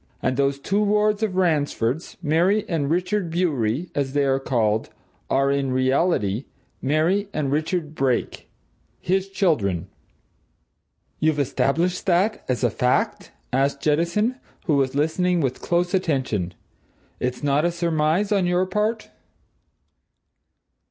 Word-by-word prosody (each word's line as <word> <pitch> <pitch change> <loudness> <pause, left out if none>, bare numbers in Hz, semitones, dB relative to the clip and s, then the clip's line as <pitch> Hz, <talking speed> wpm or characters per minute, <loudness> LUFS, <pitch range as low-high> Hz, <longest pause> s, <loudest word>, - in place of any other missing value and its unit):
And 130 - 0
those 140 +1 +1
two 195 +8 0
wards 210 0 +2
of 210 -4 -1
Ransford's, 155 -5 0
Mary 175 +7 +2
and 155 -5 -1
Richard 180 +2 0
Bewery, 160 -4 -1
as 135 -2 -2
they 145 -1 +2
are 135 0 +2
called, 110 -5 0 0.4
are, 135 +1 +2
in 140 -1 0
reality, 130 - +1 0.4
Mary 165 +9 +1
and 140 -3 -1
Richard 155 +1 -1
Brake 135 -5 -1 0.5
his 190 +2 0
children." 100 - 0 1.3
"You've 155 -1 +2
established 165 +7 0
that 190 +4 +2
as 125 0 -1
a 120 - +3
fact?" 125 0 0 0.2
asked 140 +1 +1
Jettison, 170 - +1 0.3
who 155 - +2
was 135 -1 +1
listening 175 +4 +1
with 130 -4 -1
close 175 +1 0
attention. 130 - -1 0.6
"It's 125 +2 -3
not 145 +1 +2
a 175 - +2
surmise 170 +3 0
on 195 -3 +2
your 180 +1 +2
part?" 210 +4 -2
155 Hz, 125 wpm, -23 LUFS, 135-180 Hz, 1.3 s, a